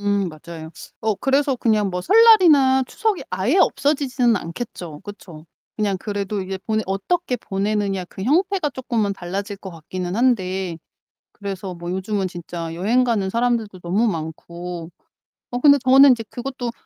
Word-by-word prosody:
음 200 Hz, -2 st, 0 dB
맞아요. 160 Hz, 0 st, -10 dB, 0.3 s
어 220 Hz, -1 st, +1 dB
그래서 275 Hz, +3 st, +1 dB
그냥 215 Hz, -4 st, +1 dB
뭐 180 Hz, -, -3 dB
설날이나 330 Hz, -, +6 dB
추석이 430 Hz, -, -1 dB
아예 195 Hz, -, +1 dB
없어지지는 270 Hz, -, +2 dB
않겠죠 170 Hz, -4 st, -7 dB
그쵸? 170 Hz, -6 st, -11 dB, 0.3 s
그냥 205 Hz, -3 st, 0 dB
그래도 200 Hz, -1 st, -3 dB
이제 190 Hz, 0 st, -5 dB
보내 220 Hz, -1 st, 0 dB
어떻게 250 Hz, -, -1 dB
보내느냐 200 Hz, -2 st, -2 dB
그 190 Hz, -, -9 dB
형태가 350 Hz, -, +1 dB
쪼끔은 235 Hz, -6 st, -1 dB
달라질 195 Hz, +3 st, -5 dB
것 190 Hz, -1 st, -9 dB
같기는 180 Hz, +3 st, -5 dB
한데 190 Hz, -8 st, 0 dB, 0.6 s
그래서 195 Hz, -2 st, -6 dB
뭐 175 Hz, +1 st, -6 dB
요즘은 190 Hz, +1 st, -1 dB
진짜 170 Hz, -1 st, -6 dB
여행 220 Hz, +9 st, +2 dB
가는 215 Hz, -6 st, 0 dB
사람들도 230 Hz, -4 st, -1 dB
너무 190 Hz, +7 st, +1 dB
많고. 170 Hz, 0 st, -5 dB, 0.6 s
어 245 Hz, -, -2 dB
근데 285 Hz, 0 st, +6 dB
저는 270 Hz, +1 st, +7 dB
이제 230 Hz, -2 st, +1 dB
그것도 250 Hz, 0 st, -5 dB
어 -, -, -2 dB
205 Hz, 335 characters per minute, -21 LUFS, 185-250 Hz, 0.6 s, 저는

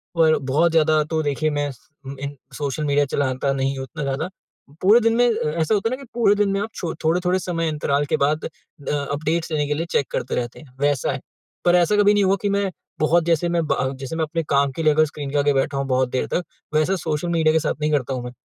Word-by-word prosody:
और 160 Hz, -1 st, +4 dB
बहुत 145 Hz, +5 st, +2 dB
ज़्यादा 155 Hz, -1 st, +3 dB
तो 160 Hz, -, +2 dB
देखिए 150 Hz, +2 st, 0 dB
मैं 145 Hz, 0 st, 0 dB
स 125 Hz, -, -15 dB, 0.3 s
अ, 140 Hz, -, -6 dB
इन 140 Hz, +1 st, -5 dB, 0.2 s
सोशल 145 Hz, +1 st, -3 dB
मीडिया 145 Hz, 0 st, +2 dB
चलाता 135 Hz, 0 st, -1 dB
नहीं 135 Hz, 0 st, -1 dB
हूँ 135 Hz, -, -4 dB
उतना 135 Hz, +3 st, -6 dB
ज़्यादा। 140 Hz, +5 st, -2 dB, 0.5 s
पूरे 210 Hz, +6 st, +6 dB
दिन 230 Hz, 0 st, +2 dB
में 245 Hz, +1 st, +4 dB
अ, 220 Hz, -9 st, -1 dB
ऐसा 160 Hz, -, +1 dB
होता 210 Hz, +2 st, 0 dB
है 255 Hz, -, -1 dB
ना 270 Hz, -, -13 dB
कि -, -, -14 dB
पूरे 225 Hz, -4 st, +3 dB
दिन 205 Hz, -1 st, +2 dB
में 195 Hz, -, 0 dB
आप 220 Hz, -, -3 dB
छो 165 Hz, -2 st, -3 dB
थोड़े-थोड़े 180 Hz, +3 st, +2 dB
समय 165 Hz, -2 st, -2 dB
अंतराल 145 Hz, -1 st, 0 dB
के -, -, +4 dB
बाद 150 Hz, +2 st, +1 dB
अ 150 Hz, -2 st, -8 dB, 0.2 s
अपडेट्स 160 Hz, +3 st, -1 dB
लेने 150 Hz, -2 st, 0 dB
के 150 Hz, -, 0 dB
लिए 165 Hz, +3 st, -2 dB
चेक 140 Hz, -, +1 dB
करते 120 Hz, -, -2 dB
रहते 120 Hz, -1 st, -3 dB
हैं, 155 Hz, -, -14 dB
वैसा 145 Hz, -2 st, +1 dB
है। -, -, -4 dB, 0.5 s
पर 175 Hz, 0 st, +5 dB
ऐसा 180 Hz, +4 st, +3 dB
कभी 205 Hz, 0 st, +5 dB
नहीं 205 Hz, -, +3 dB
हुआ 195 Hz, +1 st, +3 dB
कि 205 Hz, -, 0 dB
मैं 200 Hz, -1 st, +1 dB, 0.3 s
बहुत 165 Hz, +2 st, +3 dB
जैसे 170 Hz, 0 st, +1 dB
मैं 170 Hz, 0 st, +1 dB
ब -, -, +1 dB, 0.2 s
जैसे 135 Hz, +4 st, -5 dB
मैं 160 Hz, -, 0 dB
अपने 165 Hz, +2 st, -2 dB
काम 140 Hz, 0 st, +3 dB
के 160 Hz, +5 st, -4 dB
लिए 155 Hz, -, +5 dB
अगर 155 Hz, +1 st, +4 dB
स्क्रीन 145 Hz, -1 st, -6 dB
के 145 Hz, -, 0 dB
आगे 145 Hz, 0 st, +3 dB
बैठा 135 Hz, +1 st, 0 dB
हूँ 135 Hz, -, -1 dB
बहुत 130 Hz, -1 st, +1 dB
देर 130 Hz, -, -1 dB
तक, 180 Hz, -, -1 dB, 0.3 s
वैसा 155 Hz, +5 st, +2 dB
सोशल 160 Hz, -1 st, -2 dB
मीडिया 160 Hz, -2 st, +3 dB
के 160 Hz, -, +4 dB
साथ 155 Hz, -, -1 dB
नहीं 150 Hz, 0 st, +1 dB
करता 135 Hz, -2 st, 0 dB
हूँ 125 Hz, -, -4 dB
मैं, 125 Hz, -, -6 dB
155 Hz, 265 wpm, -22 LUFS, 140-175 Hz, 0.5 s, पूरे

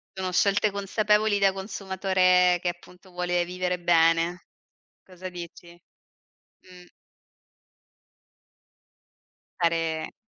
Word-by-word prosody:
Sono 190 Hz, -1 st, -3 dB
scelte 200 Hz, +3 st, +2 dB
consapevoli 210 Hz, +1 st, +1 dB
da 195 Hz, -1 st, +3 dB
consumatore 190 Hz, -2 st, +1 dB
che, 180 Hz, -, -2 dB
appunto, 180 Hz, +2 st, -10 dB
vuole 175 Hz, -1 st, -1 dB
vivere 180 Hz, 0 st, -3 dB
bene. 170 Hz, +1 st, +2 dB, 0.6 s
Cosa 185 Hz, 0 st, -9 dB
dici? 170 Hz, -1 st, -10 dB, 0.9 s
Mh. 180 Hz, -1 st, -17 dB, 2.7 s
Fare 165 Hz, -2 st, -1 dB
180 Hz, 80 wpm, -25 LUFS, 175-190 Hz, 2.7 s, da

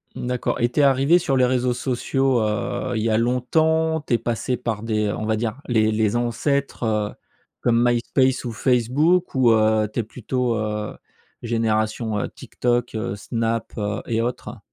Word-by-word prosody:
Mmh -, -, -5 dB
d'accord 125 Hz, -1 st, -1 dB
et 120 Hz, -, +3 dB
tu -, -, -1 dB
es -, -, +4 dB
arrivée 140 Hz, +5 st, +4 dB
sur 135 Hz, -6 st, 0 dB
les 130 Hz, -, +4 dB
réseaux 125 Hz, 0 st, +1 dB
sociaux, 130 Hz, +1 st, 0 dB
heu, 110 Hz, +4 st, -2 dB
il 110 Hz, -, 0 dB
y 115 Hz, -, +1 dB
a 110 Hz, -, +2 dB
longtemps? 160 Hz, +7 st, +1 dB
Tu 145 Hz, -, -3 dB
es 120 Hz, -, +5 dB
passée 120 Hz, +2 st, -2 dB
par 115 Hz, -3 st, -3 dB
des 105 Hz, -2 st, 0 dB
on 110 Hz, -, -4 dB
va 110 Hz, 0 st, +1 dB
dire, 115 Hz, +3 st, -3 dB
les 110 Hz, -3 st, +2 dB
les 110 Hz, 0 st, +1 dB
ancêtres, 125 Hz, +4 st, -1 dB
heu, 105 Hz, -2 st, 0 dB, 0.5 s
comme 120 Hz, 0 st, +3 dB
MySpace 125 Hz, +2 st, +1 dB
ou 120 Hz, -, -3 dB
Facebook 130 Hz, +10 st, +2 dB
ou, 125 Hz, -3 st, +5 dB
heu, 110 Hz, -1 st, +3 dB
tu -, -, 0 dB
es -, -, -6 dB
plutôt, 125 Hz, +2 st, -2 dB
heu, 105 Hz, -1 st, -3 dB, 0.5 s
génération, 110 Hz, -1 st, 0 dB
heu, -, -, -2 dB
TikTok, 120 Hz, 0 st, -2 dB
heu, 110 Hz, 0 st, -3 dB
Snap, 115 Hz, +2 st, -2 dB
heu 105 Hz, +2 st, -2 dB
et 115 Hz, -1 st, 0 dB
autres? 120 Hz, +2 st, -4 dB
120 Hz, 185 wpm, -22 LUFS, 110-130 Hz, 0.5 s, es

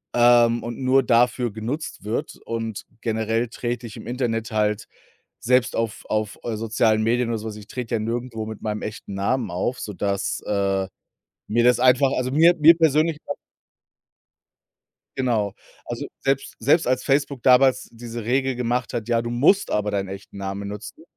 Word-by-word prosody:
ähm, 120 Hz, -1 st, +5 dB
und 120 Hz, 0 st, -5 dB
nur 130 Hz, +1 st, +4 dB
dafür 120 Hz, 0 st, +2 dB
genutzt 115 Hz, +9 st, -5 dB
wird. 110 Hz, +2 st, -3 dB
Und 115 Hz, -2 st, -4 dB, 0.2 s
generell 110 Hz, +1 st, 0 dB
trete 120 Hz, 0 st, -4 dB
ich 110 Hz, -, -10 dB
im -, -, -10 dB
Internet 115 Hz, -3 st, -2 dB
halt 105 Hz, -1 st, 0 dB, 0.6 s
selbst 125 Hz, +1 st, +2 dB
auf 115 Hz, -1 st, -2 dB
auf, 110 Hz, -1 st, -2 dB
äh, 115 Hz, -2 st, -2 dB
sozialen 110 Hz, 0 st, +1 dB
Medien 120 Hz, +2 st, +1 dB
oder 115 Hz, -, -1 dB
so 110 Hz, +1 st, -6 dB
was 105 Hz, -, -7 dB
ich 105 Hz, -1 st, -11 dB
trete 120 Hz, 0 st, -3 dB
ja -, -, 0 dB
nirgendwo 115 Hz, 0 st, -3 dB
mit 110 Hz, -1 st, -8 dB
meinem 105 Hz, -1 st, -2 dB
echten 105 Hz, -1 st, -6 dB
Namen 105 Hz, +3 st, -1 dB
auf, 95 Hz, +9 st, -2 dB
sodass, 100 Hz, -1 st, -2 dB
äh, 100 Hz, -1 st, 0 dB, 0.6 s
mir 120 Hz, +2 st, +2 dB
das 125 Hz, -1 st, +4 dB
einfach 130 Hz, +2 st, +4 dB
also 130 Hz, 0 st, -1 dB
mir 165 Hz, +5 st, +5 dB
mir 160 Hz, +2 st, +8 dB
persönlich 155 Hz, 0 st, +3 dB
au -, -, -3 dB, 1.8 s
Genau. 115 Hz, -6 st, 0 dB, 0.3 s
Also, -, -, -5 dB
selbst 135 Hz, 0 st, -1 dB
selbst 145 Hz, +6 st, +3 dB
als 130 Hz, 0 st, +1 dB
Facebook 140 Hz, -2 st, 0 dB
damals 130 Hz, 0 st, +4 dB
diese 115 Hz, 0 st, -7 dB
Regel 130 Hz, +2 st, +1 dB
gemacht 125 Hz, 0 st, -1 dB
hat: 115 Hz, -3 st, -3 dB
„Ja, 115 Hz, -1 st, +2 dB
du 120 Hz, -, -4 dB
musst 145 Hz, +12 st, +3 dB
aber 105 Hz, 0 st, 0 dB
deinen 100 Hz, -1 st, -1 dB
echten 95 Hz, +1 st, -9 dB
Namen 100 Hz, +1 st, -4 dB
nutzen.“, 105 Hz, +1 st, -9 dB
115 Hz, 170 wpm, -23 LUFS, 110-125 Hz, 1.8 s, mir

